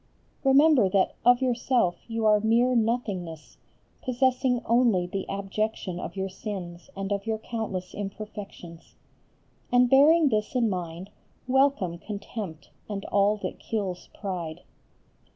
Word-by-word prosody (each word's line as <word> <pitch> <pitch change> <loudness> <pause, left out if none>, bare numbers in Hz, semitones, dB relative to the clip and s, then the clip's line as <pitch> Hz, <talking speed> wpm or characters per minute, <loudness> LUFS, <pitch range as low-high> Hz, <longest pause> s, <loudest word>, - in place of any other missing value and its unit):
Remember 270 -5 +5
that 190 0 +2
of 245 +2 +5
yourself 240 -6 +1
you 225 -1 -2
are 210 -1 +5
mere 230 +4 +3
nothingness, 205 -9 -2 0.4
possessing 255 0 +1
only 230 -6 +3
the 195 +2 -5
abjection 200 -2 -3
of 175 - -6
your 190 0 -2
sins 185 -3 -7
and 195 0 -3
of 200 +1 -2
your 220 -1 0
countless 215 -5 -5
imperfections. 200 -4 -8 0.8
And 245 0 +4
bearing 300 +3 +6
this 215 +1 -1
in 230 -4 +2
mind, 175 +1 -5 0.4
welcome 260 -10 +2
contempt 200 -5 -7 0.2
and 200 -2 -4
all 205 +1 +2
that - - -4
kills 195 -5 -4
pride. 175 -5 -4
210 Hz, 125 wpm, -27 LUFS, 185-245 Hz, 0.8 s, bearing